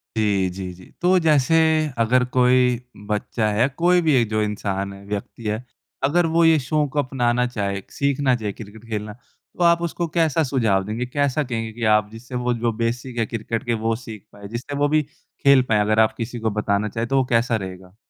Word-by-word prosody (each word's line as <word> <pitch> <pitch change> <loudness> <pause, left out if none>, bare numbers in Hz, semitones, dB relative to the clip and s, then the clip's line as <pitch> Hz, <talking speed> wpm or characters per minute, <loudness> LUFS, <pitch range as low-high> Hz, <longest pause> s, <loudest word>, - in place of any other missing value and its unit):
जी, 100 -4 +1
जी, 90 0 -6
जी। 90 +1 -15 0.2
तो 185 +1 +4
जैसे 155 -2 +3 0.4
अगर 125 +2 +3
कोई 125 -1 +4 0.3
बच्चा 105 +1 -1
है, 115 +5 +3
कोई 175 +6 +2
भी 160 -3 +2
एक 120 -4 +2
जो 110 0 0
इंसान 100 -2 -2
है, 100 0 -12
व्यक्ति 105 +3 -6
है 110 +3 -2 0.4
अगर 165 +6 +3
वो 170 0 +4
ये 165 -1 +6
शौक़ 145 +1 -1
अपनाना 125 -2 +1
चाहे, 100 -5 -3
सीखना 140 -2 +1
चाहे 110 -3 -3
क्रिकेट 110 +2 -12
खेलना 105 -1 -4 0.4
तो 180 - +1
आप 170 0 +4
उसको 170 0 -2
कैसा 160 -1 +1
सुझाव 115 -9 +1
देंगे? 110 +4 -3
कैसा 140 +3 0
कहेंगे 115 -4 -4
कि 115 - -7
आप 105 -1 +2
जिससे 120 +3 -9
वो 125 - +2
जो 120 0 0
बेसिक 120 +2 -2
है 115 - +2
क्रिकेट 115 0 -4
के 120 - 0
वो 115 0 0
सीख 110 -3 -10
पाएँ, 100 0 -10
जिससे 120 +6 -6
वो 145 +1 +2
भी 155 +1 +3 0.4
खेल 140 -2 +6
पाएँ? 110 -1 +3
अगर 110 +1 +2
आप 110 - +4
किसी 120 +1 -4
को 110 0 0
बताना 105 0 0
चाहे 115 +2 -3
तो 135 +3 0
वो 130 - +3
कैसा 120 -1 +1
रहेगा? 95 -2 -7
120 Hz, 205 wpm, -22 LUFS, 105-135 Hz, 0.4 s, ये